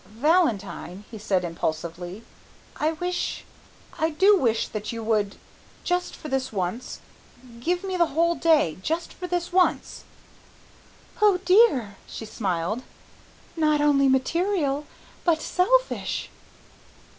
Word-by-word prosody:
"Valentine," 215 Hz, -, 0 dB
he 220 Hz, -, -8 dB
said 195 Hz, -4 st, 0 dB
impulsively, 170 Hz, +4 st, -4 dB, 0.5 s
"I 310 Hz, +2 st, 0 dB
wish, 355 Hz, +2 st, -3 dB, 0.5 s
I 320 Hz, -, +2 dB
do 380 Hz, +7 st, +5 dB
wish 230 Hz, -, +1 dB
that 215 Hz, -1 st, -4 dB
you 230 Hz, -1 st, -5 dB
would, 215 Hz, -2 st, 0 dB, 0.5 s
just 355 Hz, 0 st, -1 dB
for -, -, -9 dB
this 265 Hz, -2 st, -1 dB
once, 200 Hz, +5 st, -4 dB, 0.6 s
give 350 Hz, +9 st, -1 dB
me 380 Hz, -1 st, -2 dB
the 340 Hz, -1 st, +4 dB
whole 335 Hz, +3 st, +2 dB
day, 310 Hz, -, +2 dB
just 325 Hz, -, -2 dB
for 360 Hz, -, -6 dB
this 350 Hz, 0 st, -2 dB
once." 365 Hz, -1 st, +1 dB, 1.2 s
"Oh 415 Hz, -3 st, +5 dB
dear," 350 Hz, -, +4 dB
she 225 Hz, -, -7 dB
smiled, 200 Hz, 0 st, -2 dB, 0.7 s
"not 305 Hz, -2 st, +2 dB
only 285 Hz, -2 st, +4 dB
material, 295 Hz, +1 st, +1 dB, 0.4 s
but 335 Hz, -3 st, +3 dB
selfish!" -, -, 0 dB
290 Hz, 120 wpm, -25 LUFS, 210-350 Hz, 1.2 s, do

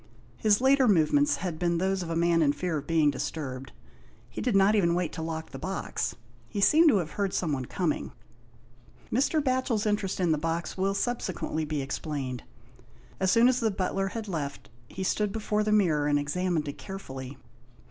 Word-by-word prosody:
His 215 Hz, 0 st, +3 dB
later 265 Hz, 0 st, +5 dB
movements 225 Hz, -, +3 dB
had 175 Hz, -4 st, -4 dB
been 170 Hz, -1 st, +1 dB
those 190 Hz, +2 st, 0 dB
of 170 Hz, -, -5 dB
a 165 Hz, -, -2 dB
man 170 Hz, 0 st, +3 dB
in 145 Hz, -2 st, +3 dB
fear 165 Hz, +2 st, -2 dB
of 145 Hz, -, -11 dB
being 160 Hz, -3 st, +3 dB
disturbed. 135 Hz, -3 st, -5 dB, 0.6 s
He -, -, -5 dB
did 245 Hz, -5 st, 0 dB
not 195 Hz, +2 st, +5 dB
even 170 Hz, -5 st, +3 dB
wait 175 Hz, -3 st, -1 dB
to 165 Hz, -, -5 dB
lock 160 Hz, 0 st, -5 dB
the -, -, -7 dB
box. 185 Hz, -10 st, -3 dB, 0.3 s
He 205 Hz, -, -4 dB
seemed 315 Hz, +10 st, +6 dB
to 230 Hz, -, +4 dB
have 165 Hz, -4 st, -2 dB
heard 200 Hz, -2 st, -2 dB
someone 145 Hz, -7 st, -1 dB
coming. -, -, -2 dB, 1.0 s
Mr. 280 Hz, +5 st, +2 dB
Batchel's 255 Hz, -5 st, 0 dB
interest 205 Hz, -3 st, -1 dB
in 175 Hz, -3 st, +2 dB
the 155 Hz, -, +1 dB
box 165 Hz, +2 st, -2 dB
will 195 Hz, +1 st, 0 dB
subse 240 Hz, -2 st, -1 dB
quently 160 Hz, -2 st, -3 dB
be 150 Hz, -2 st, -2 dB
explained. 135 Hz, -2 st, -4 dB, 0.8 s
As 190 Hz, -, +2 dB
soon 230 Hz, +5 st, +5 dB
as 255 Hz, 0 st, +3 dB
the 225 Hz, -, +1 dB
butler 195 Hz, 0 st, -1 dB
had 220 Hz, +2 st, -5 dB
left, 150 Hz, -7 st, -5 dB, 0.2 s
he 190 Hz, -, -6 dB
stood 210 Hz, +2 st, 0 dB
before 210 Hz, 0 st, -1 dB
the 215 Hz, -, 0 dB
mirror 165 Hz, -9 st, +3 dB
and 145 Hz, 0 st, +3 dB
examined 155 Hz, +2 st, -1 dB
it 145 Hz, -, -6 dB
carefully. 135 Hz, -8 st, -8 dB
180 Hz, 190 wpm, -28 LUFS, 155-210 Hz, 1.0 s, seemed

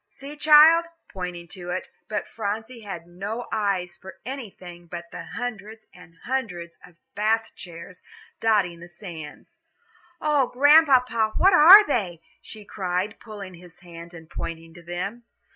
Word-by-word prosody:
"See, 280 Hz, +2 st, -11 dB
child," 310 Hz, +3 st, +7 dB, 0.3 s
pointing 180 Hz, -2 st, -6 dB
to 180 Hz, 0 st, -9 dB
it; -, -, -4 dB, 0.2 s
but 210 Hz, -, -3 dB
Phronsie 220 Hz, +3 st, -5 dB
had 190 Hz, -5 st, -8 dB
no 200 Hz, +7 st, -6 dB
eyes 190 Hz, -4 st, -1 dB
for 190 Hz, 0 st, -13 dB
anything 185 Hz, -9 st, -9 dB
but 170 Hz, 0 st, -9 dB
the -, -, -8 dB
hundreds 220 Hz, -2 st, -6 dB
and 170 Hz, -2 st, -17 dB
hundreds 180 Hz, -10 st, -4 dB
of 180 Hz, -, -17 dB, 0.2 s
Bath 220 Hz, +2 st, 0 dB
chairs 175 Hz, +1 st, -11 dB, 0.4 s
dotting 200 Hz, -6 st, +1 dB
the 170 Hz, -, -11 dB
sands. 175 Hz, -, -11 dB, 0.6 s
"Oh, 295 Hz, -4 st, +2 dB
Grandpapa, 255 Hz, -6 st, +4 dB
what 385 Hz, +1 st, +5 dB
are 360 Hz, +6 st, +10 dB
they?" 190 Hz, -, -2 dB, 0.2 s
she 215 Hz, -2 st, -11 dB
cried, 190 Hz, +1 st, -3 dB
pulling 205 Hz, -4 st, -10 dB
his 175 Hz, 0 st, -15 dB
hand 170 Hz, -1 st, -12 dB
and 160 Hz, -1 st, -12 dB
pointing 165 Hz, 0 st, -7 dB
to 175 Hz, -, -14 dB
them. 185 Hz, +7 st, -6 dB
200 Hz, 145 wpm, -24 LUFS, 175-240 Hz, 0.6 s, are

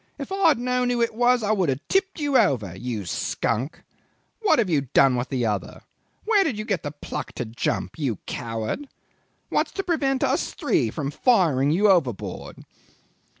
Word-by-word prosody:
If 280 Hz, +4 st, -7 dB
I 390 Hz, -1 st, +3 dB
had 310 Hz, -, +5 dB
known 250 Hz, +1 st, 0 dB
who 245 Hz, -1 st, 0 dB
it 235 Hz, -1 st, +1 dB
was, 245 Hz, +1 st, +3 dB
I 210 Hz, -, +1 dB
would 190 Hz, -7 st, +1 dB
have 135 Hz, +2 st, -3 dB
tipped 385 Hz, -2 st, 0 dB
you 290 Hz, -2 st, -1 dB
over 130 Hz, -, +2 dB
you 115 Hz, -1 st, -4 dB
skunk! 115 Hz, -, -2 dB, 0.6 s
What 430 Hz, -, +4 dB
have 230 Hz, -, +2 dB
you 155 Hz, -5 st, +2 dB
done 135 Hz, -2 st, +6 dB
with 125 Hz, +1 st, -2 dB
the 125 Hz, -3 st, -1 dB
other? 105 Hz, -3 st, -3 dB, 0.4 s
Where 420 Hz, -2 st, +4 dB
did 275 Hz, -, -2 dB
you 215 Hz, -, -4 dB
get 195 Hz, -7 st, -1 dB
the 145 Hz, -, -4 dB
pluck 145 Hz, 0 st, -6 dB
to -, -, -4 dB
jump 115 Hz, +7 st, -3 dB
you 135 Hz, -7 st, 0 dB
coward? 115 Hz, -, -4 dB, 0.6 s
What's -, -, 0 dB
to 390 Hz, -, -2 dB
prevent 275 Hz, -7 st, 0 dB
us -, -, 0 dB
three 145 Hz, -, +1 dB
from 140 Hz, +4 st, -4 dB
firing 155 Hz, -, +3 dB
you 190 Hz, +8 st, +3 dB
overboard? 155 Hz, -, 0 dB
185 Hz, 185 wpm, -24 LUFS, -, 0.6 s, done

